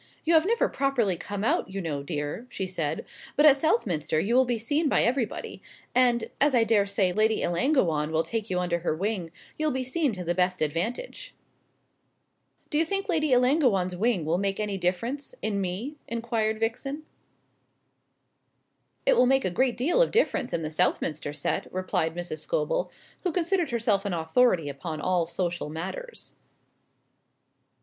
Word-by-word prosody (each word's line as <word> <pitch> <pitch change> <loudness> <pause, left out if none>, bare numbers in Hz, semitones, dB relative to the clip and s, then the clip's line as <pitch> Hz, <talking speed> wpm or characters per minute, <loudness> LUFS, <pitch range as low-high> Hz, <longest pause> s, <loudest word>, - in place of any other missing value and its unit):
"You 335 - +3
have 320 +2 +5
never 465 +2 +2
properly 255 -9 0
come 205 +4 -5
out, 220 - +1
you 195 +1 -5
know, 155 -6 -3
dear," 150 - -4
she 190 - -3
said; 170 -5 -3 0.3
"but 295 - +4
at 290 -3 +9
Southminster 185 - +1
you 205 +8 0
will 260 +1 +5
be 240 -1 0
seen 290 +7 0
by - - +3
everybody; 240 -2 -2 0.3
and, 245 -2 +3
as 285 -1 +4
I 235 - +5
daresay 200 -4 +2
Lady 215 +3 +2
Ellangowan 170 - +1
will 160 0 +2
take 225 +1 -3
you 180 - 0
under 175 -1 0
her 165 -2 -1
wing, 185 -2 -2 0.3
you'll 310 0 +2
be 260 -2 -1
seen 275 +2 0
to 185 -2 -5
the 175 0 0
best 180 +1 +1
advantage." 170 - -3 1.4
"Do 295 - +2
you - - +4
think 395 +5 -2
Lady 310 -4 +1
Ellangowan's 250 - +3
wing 200 -4 +1
will 165 +3 +1
make 195 0 -1
any 210 -2 -1
difference 230 - -2
in 200 -2 -1
me?" 200 +11 -3
inquired 230 -2 -1
Vixen. 275 +6 -2 2.0
"It - - +5
will 255 - +5
make 270 0 +3
a 185 - 0
great 255 +6 +1
deal 330 - +2
of - - +4
difference 350 - +1
in 165 - -2
the 155 - -3
Southminster 155 -3 0
set," 145 0 -2
replied 180 -3 -1
Mrs. 175 -3 -5
Scobel, - - -1 0.3
who 360 - -1
considered 350 -1 0
herself 225 -5 +1
an 195 -3 -1
authority 165 +1 +2
upon 150 +3 -5
all 175 0 +1
social 175 -2 -2
matters. 190 - -7
215 Hz, 165 wpm, -27 LUFS, 175-270 Hz, 2.0 s, at